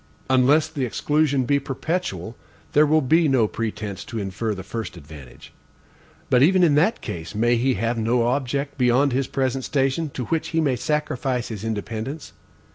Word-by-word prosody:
Unless 140 +5 +4
the 150 -4 -3
exclusion 140 +3 +1
be 140 +2 +2
perpetual, 135 - -3 0.4
there 150 +1 +5
will 155 0 +3
be 160 +5 +3
no 130 -6 +3
pretense 105 -3 -4
to 115 - -6
infer 105 +2 -3
the 95 - -7
first 110 -1 -6
advantage. 70 -5 -13 0.8
But 125 - +5
even 180 +5 +5
in 160 -4 +4
that 175 +11 +2
case, 85 +4 -6
may 120 +3 +3
he 130 +3 +1
have 115 +3 -1
no 115 +2 +2
object 140 +3 -1
beyond 125 +2 +3
his 135 +1 0
present 130 -1 -1
station, 135 +4 0
to 125 - -3
which 165 +3 -1
he 165 - -1
may 140 -5 +2
sacrifice 130 -3 -2
his 110 -3 -6
independence? 115 +6 -5
130 Hz, 170 wpm, -23 LUFS, 115-145 Hz, 0.8 s, there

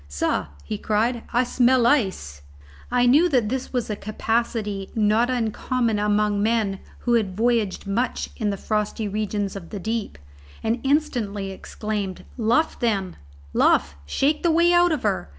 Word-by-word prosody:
"Sah," 70 0 -1 0.2
he 100 +9 -5
cried, 225 +3 0
"I 245 +1 +3
smell 250 0 +3
ice!" 190 - +1 0.5
I 245 0 +3
knew 295 +8 +5
that 245 -8 +2
this 260 +1 -3
was 245 -3 -1
a 210 - -2
capacity 215 -2 -2
not 220 +2 +3
uncommon 235 -1 0
among 210 0 +1
men 215 -3 +1 0.2
who 240 - +1
had 200 -5 +1
voyaged 225 -4 +1
much 225 +6 -1
in 215 -4 -1
the 200 - -2
frosty 215 +1 -2
regions 205 -1 -2
of 175 -4 -8
the 205 - -6
deep, 220 - -3 0.5
and 225 +2 0
instantly 240 -9 0
exclaimed, 200 -1 -5
"Luff, 240 +7 +1
then, 195 -6 0 0.4
luff! 70 0 +3
shake 290 - +1
the 340 - +2
way 340 +2 +4
out 350 0 +5
of 305 -5 -1
her!" 195 - -1
220 Hz, 155 wpm, -23 LUFS, 200-245 Hz, 0.5 s, knew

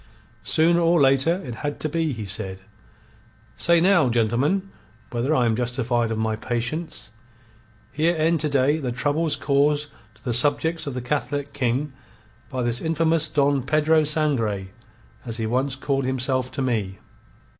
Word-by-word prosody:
"Sooner 170 +2 +3
or 170 0 +3
later 140 +7 +3
it 120 - -5
had 145 0 -4
to - - 0
be," 160 0 -1
he 110 -5 -5
said. 95 -1 -4 1.0
"Say 170 0 +3
now, 175 -6 +4
gentlemen, 125 - 0 0.4
whether 125 +6 0
I 125 - +2
am 115 -1 +1
justified 120 -1 0
of 110 - -2
my 110 0 -1
patience. 120 +4 -4 0.8
Here 165 +4 +1
end 160 +1 +2
to 150 - +1
day 140 +2 +2
the 130 -5 -3
troubles 145 +5 0
caused 145 +2 +1 0.3
to 105 - -23
the 120 - -1
subjects 155 +5 +2
of 135 - -4
the 125 - -4
Catholic 140 +1 -2
King 130 +2 -1 0.6
by 130 -2 -3
this 120 0 -1
infamous 160 0 +2
Don 140 -2 +1
Pedro 155 +4 +2
Sangre, 125 -11 0 0.5
as 115 -2 -5
he 110 - -2
once 130 +4 0
called 135 0 -1
himself 130 0 0
to 135 - -2
me." 105 -7 -2
140 Hz, 155 wpm, -23 LUFS, 120-155 Hz, 1.0 s, now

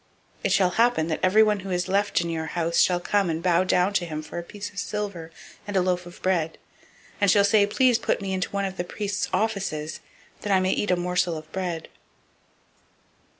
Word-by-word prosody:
002:036 - - -10
It - - +2
shall 190 -2 +4
happen, 230 -6 +2
that 160 - -1
everyone 210 +2 +4
who 195 0 -7
is 180 0 -1
left 200 -1 +1
in 170 - -3
your 160 -1 -3
house 170 0 +1
shall 180 -1 +4
come 195 +1 +1
and 165 0 -2
bow 180 0 +3
down 185 +1 +2
to 190 - +1
him 155 -1 -5
for 165 - -6
a - - -6
piece 205 +3 -7
of 200 - -6
silver 200 -6 -4 0.4
and 205 -1 -1
a - - +4
loaf 180 -1 -1
of 175 - -12
bread, 170 -4 0 0.6
and 200 - +4
shall 200 +1 +5
say, 200 0 +4
Please 245 +2 +3
put - - 0
me 195 -2 -3
into 185 -1 -1
one 200 0 -1
of 190 0 -5
the 175 - -1
priests' 205 +2 -3
offices, 195 -8 -2 0.4
that 205 - -3
I 190 - +5
may 185 0 +1
eat 205 - -1
a 180 - +4
morsel 180 -1 0
of 155 0 -11
bread. 175 -4 -3
185 Hz, 220 wpm, -25 LUFS, 175-200 Hz, 0.6 s, shall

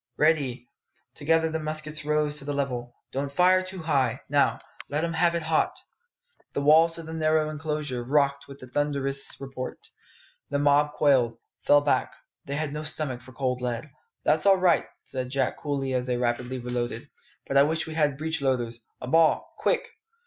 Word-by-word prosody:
"Ready!" 140 -6 +1 0.5
Together 160 +2 +2
the 160 - -1
muskets 155 0 -3
rose 150 0 +1
to 140 - -3
the 145 - -2
level. 125 -3 -3 0.2
"Don't 140 +1 -3
fire 185 +4 +4
too 185 -2 -7
high. 135 -6 +1
Now, 145 0 +2 0.3
let 150 +3 -1
'em 170 0 -1
have 170 +1 +2
it 170 - -1
hot!" 160 0 +1 0.8
The - - -1
walls 160 +3 +5
of 165 - -7
the 160 - -7
narrow 155 -1 +1
enclosure 150 -5 -3
rocked 140 +1 +1
with 140 0 -10
the 130 - -11
thunderous 140 0 -1
report. 135 -2 -6 0.7
The 140 - 0
mob 145 +1 +3
quailed, 130 -6 +3 0.3
fell 145 0 +7
back: 145 - 0 0.3
"they 140 - -3
had 150 -1 -2
no 150 - -3
stomach 150 -5 -2
for 130 +1 -14
cold 125 -2 -1
lead. 125 +3 -3 0.3
"That's 155 +5 +2
all 195 -1 +7
right," 185 -2 +3 0.2
said 130 -1 -4
Jack 135 -1 -1
coolly 135 -2 -2
as 125 0 -1
they 125 -1 0
rapidly 125 +1 -1
reloaded; 120 -1 -3 0.4
"but 135 - -4
I 140 - +8
wish 160 +3 +1
we 160 - -7
had 150 -3 +1
breechloaders! 135 -7 -1 0.2
A - - -5
ball, 160 +3 +3
quick!" - - +1
145 Hz, 180 wpm, -26 LUFS, 130-155 Hz, 0.8 s, I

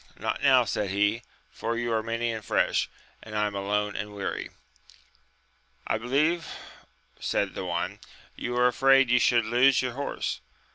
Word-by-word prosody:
Not - - -3
now, - - +5
said 105 -2 -2
he, 105 +4 +1 0.3
for 115 +1 -3
you 120 -1 -1
are 110 - +1
many 115 +1 -2
and 110 -1 -5
fresh, - - +1 0.3
and 105 -1 -6
I 105 - +2
am 105 - -3
alone 105 +1 -1
and 105 0 -5
weary. 100 - -4 1.4
I 110 - 0
be 120 - -8
lieve 155 +6 +1 0.7
said - - -1
the - - -5
one, - - -3 0.4
you 120 0 -3
are 125 - +4
afraid 135 +1 +4
you 125 - +5
should 120 -2 +3
lose 125 +4 +4
your 125 -1 -2
horse. 140 +3 -3
115 Hz, 170 wpm, -27 LUFS, 105-125 Hz, 1.4 s, now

